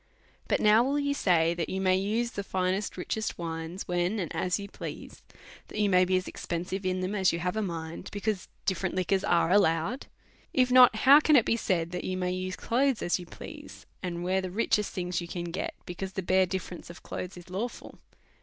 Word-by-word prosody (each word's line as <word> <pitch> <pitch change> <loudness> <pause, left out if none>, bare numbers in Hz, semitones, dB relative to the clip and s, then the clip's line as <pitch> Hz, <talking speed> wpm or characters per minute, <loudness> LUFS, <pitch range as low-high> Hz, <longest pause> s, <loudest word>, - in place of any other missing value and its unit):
But - - +2
now 215 +2 +5
will 275 +3 0
you 285 -1 +1
say, 170 -9 +3
that 170 -2 -3
you 190 - -2
may 185 -1 +3
use 220 +5 0
the 200 - -4
finest 190 +1 -1
richest 220 +4 -3
wines, 165 +2 -5
when 175 +4 0
and 180 -6 -3
as 180 -2 0
you 200 -1 -6
please, - - -8 0.5
that - - -9
you 205 -1 +2
may 185 0 +5
be 185 0 +2
as 185 - -3
expensive 185 +3 -4
in 185 0 -1
them 185 +2 -2
as 190 -4 +3
you 170 - -2
have 180 +3 -2
a 220 - 0
mind, 165 -4 -5
because 205 -2 -2 0.2
different 190 -1 -1
liquors 185 +1 +1
are 170 0 +2
allowed? 195 +5 +2 0.5
If 255 -1 +3
not, 250 -2 +8
how 270 +6 +7
can 305 0 +4
it 240 - +6
be - - +2
said 170 -7 -1
that 180 - -4
you 185 - -2
may 180 -1 -1
use 185 0 -3
clothes 255 +1 +1
as 175 - +1
you 175 - -9
please, - - -10 0.2
and 175 -2 -4
wear 190 +1 +1
the 185 - -4
richest 210 +1 +1
things 180 -1 -2
you 170 - -6
can 170 0 -5
get, 185 - -3
because 190 +2 -6
the 190 - -3
bare 185 +1 +3
dif 190 +1 -3
ference 175 - -10
of 170 - -11
clothes 180 0 -6
is 175 +1 -12
lawful 220 +6 -5
185 Hz, 220 wpm, -28 LUFS, 175-210 Hz, 0.5 s, not